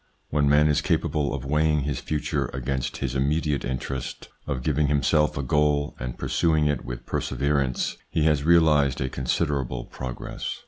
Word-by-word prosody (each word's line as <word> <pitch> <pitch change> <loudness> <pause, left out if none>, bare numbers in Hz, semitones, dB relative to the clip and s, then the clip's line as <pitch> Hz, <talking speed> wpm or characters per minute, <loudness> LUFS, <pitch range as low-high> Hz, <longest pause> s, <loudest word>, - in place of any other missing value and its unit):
When 70 -1 +2
man 75 +1 +5
is 75 0 +2
capable 75 -3 0
of - - -4
weighing 75 +1 +2
his 70 -2 -2
future 75 -2 -2
against 65 -1 -2
his 65 -2 -2
immediate 75 +2 0
interest, 65 +1 -4 0.2
of 65 -4 -2
giving 75 +1 +1
himself 75 +1 +2
a 70 - -1
goal 75 +2 +1
and 60 -1 -5
pursuing 80 -3 +1
it 75 -3 0
with - - -7
perseverance, 70 -3 -1
he 80 - 0
has 75 -2 +3
realised 75 -4 +4
a 65 - -1
considerable 65 -2 -1
progress. 65 -2 -6
70 Hz, 155 wpm, -25 LUFS, 65-75 Hz, 0.2 s, man